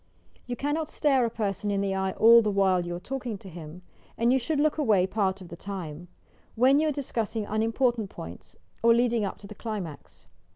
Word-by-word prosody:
You 245 - -3
cannot 290 +5 -1
stare 270 -4 +2
a - - 0
person 210 -2 -2
in 200 -1 0
the 195 -1 0
eye 190 0 -1
all 230 +1 +7
the 215 - 0
while 190 -3 +2
you 175 - -3
are - - -5
talking 250 0 -5
to 195 - -13
him, 170 0 -10 0.3
and 235 +2 +3
you 265 - +3
should 285 +4 -1
look 310 +1 +1
away 210 -10 +3
part 195 -1 -1
of 180 - -11
the - - -8
time, 175 -4 -7 0.2
— - - -34
when 260 +5 +5
you 310 - +2
are - - +2
discussing 230 -6 -3
unimportant 225 +1 0
pointa 90 +2 -10 0.3
or 230 0 +5
leading 235 -2 +2
up 195 - -5
to - - -13
the 205 - -9
climax. 200 -9 -7
215 Hz, 215 wpm, -27 LUFS, 190-245 Hz, 0.3 s, all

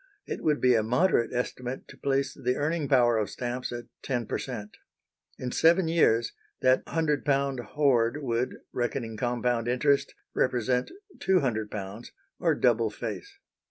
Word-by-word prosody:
It - - -5
would 150 -2 +2
be 125 -1 +4
a 115 - +4
moderate 125 - +2
estimate 125 +1 -4
to - - -11
place 135 0 0
the 125 0 -1
earning 150 +1 -1
power 120 -4 +4
of 105 - -1
stamps 125 +1 -4
at 120 0 -5 0.2
10 125 -4 -2
per - - -3
cent. 105 -5 -6 0.6
In 125 -1 -4
seven 170 +4 +4
years 120 -9 +3 0.3
that 130 0 +4
£100 140 -4 +1
hoard 125 +1 +1
would, 120 0 -1 0.2
reckoning 120 -2 -2
compound 120 0 0
interest, 140 +3 +2 0.2
represent 125 0 +1 0.3
£200, 110 - -1 0.3
or 165 -3 +2
double 115 -4 +3
face. 105 -3 -6
125 Hz, 140 wpm, -28 LUFS, 115-140 Hz, 0.6 s, be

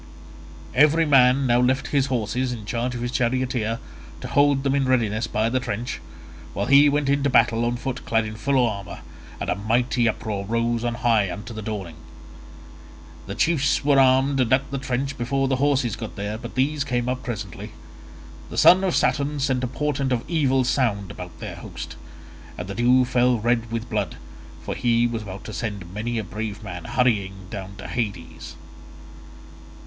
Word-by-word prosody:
Every 155 +4 +5
man 135 -1 +5
now 120 -1 +3
left 130 +2 +1
his 140 -2 +2
horses 125 0 -1
in 115 -4 -6
charge 120 +3 -2
of 120 - -4
his 120 0 -2
charioteer 125 -3 0 0.4
to - - -5
hold 140 -1 +3
them 135 -1 +1
in 140 -1 +2
readiness 115 -3 +1
by 110 0 0
the 130 +3 +1
trench, 120 -1 -4 0.5
while - - -1
he 140 +1 +6
went 145 0 0
into 140 0 +2
battle 115 -3 +3
on 120 +1 0
foot 125 +1 -4
clad 115 -1 +1
in 110 - -5
full 130 +2 +2
armour, 100 -5 -6 0.4
and - - -4
a - - +2
mighty 120 +3 +1
uproar 105 -3 -3
rose 115 +2 -1
on 120 -1 -1
high 115 -4 +2
into 105 +6 -7
the 110 - -6
dawning. 100 -7 -5 1.3
The 100 - -5
chiefs 140 +1 +1
were 140 -2 +5
armed 135 +1 +4
and 125 -3 +1
at 135 +1 +2
the 140 - -2
trench 135 +1 -3
before 135 +3 0
the 135 -1 +1
horses 135 -5 +1
got 110 - -7
there, 100 +1 -4
but 110 - -8
these 140 +3 +1
came 125 -3 -1
up 125 0 -2
presently. 105 -7 -6 0.8
The - - -7
son 185 +2 +7
of 185 -3 +1
Saturn 145 +1 +1
sent 130 -2 0
a - - +1
portent 140 0 -2
of 120 -2 -1
evil 135 -6 +2
sound 110 -7 0
about 90 -1 -9
their - - -7
host, - - -8 0.6
and 90 - -5
the 100 - -5
dew 125 +4 +4
fell 125 0 +2
red 115 0 0
with 115 0 -3
blood, - - -2 0.5
for - - -3
he 120 -1 +2
was 115 -1 -2
about 100 -1 -8
to 110 - -8
send 100 -6 -5
many 115 +3 -3
a 110 - -1
brave 105 +2 -5
man 90 -3 -7
hurrying 100 -7 0
down 100 -2 -7
to - - -8
Hades. 100 -8 -5
120 Hz, 185 wpm, -23 LUFS, 110-135 Hz, 1.3 s, son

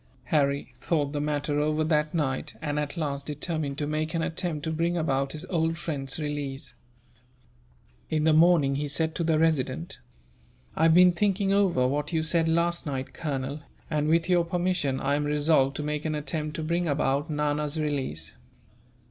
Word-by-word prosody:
Harry 140 -4 0
thought 145 0 0
the 145 - -1
matter 145 0 -1
over 155 +1 +1
that 150 -1 +1
night 140 -5 -2
and, 150 -2 -2
at 150 +3 -4
last, 140 -3 -3
determined 150 -1 -3
to 145 - -1
make 155 +2 -2
an 165 - 0
attempt 160 -2 -3
to 160 - -2
bring 170 +2 0
about 135 -4 0
his 155 +3 -6
old 165 -2 0
friend's 140 -5 -4
release. 145 -2 -4 1.4
In 155 -1 +1
the 160 0 +4
morning 155 -4 +5
he 145 +1 -2
said 160 +3 0
to 170 - -2
the 160 -1 +2
Resident: 145 - 0 0.8
"I - - -2
have 165 0 +5
been 180 0 +8
thinking 195 +1 +1
over 180 -11 +3
what 145 +3 -1
you 160 -1 +1
said 165 0 +2
last 170 0 +1
night, 135 -2 -4
Colonel, 140 -1 -3 0.3
and 150 -1 +1
with 165 +2 +3
your 175 -2 +4
permission 175 -5 0
I 135 +1 0
am 145 +1 +1
resolved 145 -2 +2
to 150 - -3
make 150 0 -2
an 155 -1 -1
attempt 150 0 -3
to 160 - -3
bring 170 +2 0
about 145 +1 0
Nana's 150 0 -1
release." 130 - -2
150 Hz, 180 wpm, -27 LUFS, 145-165 Hz, 1.4 s, been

